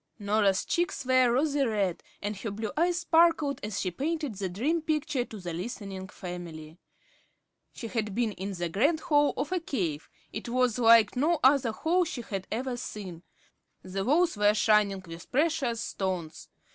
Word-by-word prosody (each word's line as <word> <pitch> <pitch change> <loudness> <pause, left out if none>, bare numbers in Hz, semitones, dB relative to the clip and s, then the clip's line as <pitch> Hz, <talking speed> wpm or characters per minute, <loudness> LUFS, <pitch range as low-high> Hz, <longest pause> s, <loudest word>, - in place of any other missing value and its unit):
Norah's 205 -2 +1
cheeks 345 -5 -1
were 255 -1 +4
rosy 285 +2 +2
red, 205 -7 0 0.2
and 205 +1 -2
her 220 - -4
blue 210 +1 -4
eyes 345 +1 +1
sparkled 325 -4 +3
as 210 -1 -3
she 185 - -1
painted 295 - -2
the 195 -1 -3
dream 280 - 0
picture 300 -5 -1
to 220 - -10
the 175 -2 -5
listening 190 0 -6
family. 175 -4 -8 0.9
She - - -8
had 215 -4 -3
been 235 -2 +1
in 195 0 -5
the 175 -1 -2
grand 285 - +1
hall 295 -3 +3
of 280 +4 -2
a 370 - +1
cave. 180 - -3 0.2
It 220 - -5
was 250 -1 +1
like 230 -1 +6
no 305 +5 +2
other 260 -3 +4
hall 340 +10 +1
she 280 -8 -5
had 195 -3 -5
ever 245 +2 -2
seen. 190 -8 -7 0.6
The 190 +1 -3
walls 320 - +3
were 205 0 +3
shining 210 -3 +3
with 165 0 -11
precious 275 -5 +1
stones. 180 -7 -4
225 Hz, 170 wpm, -28 LUFS, 195-285 Hz, 0.9 s, like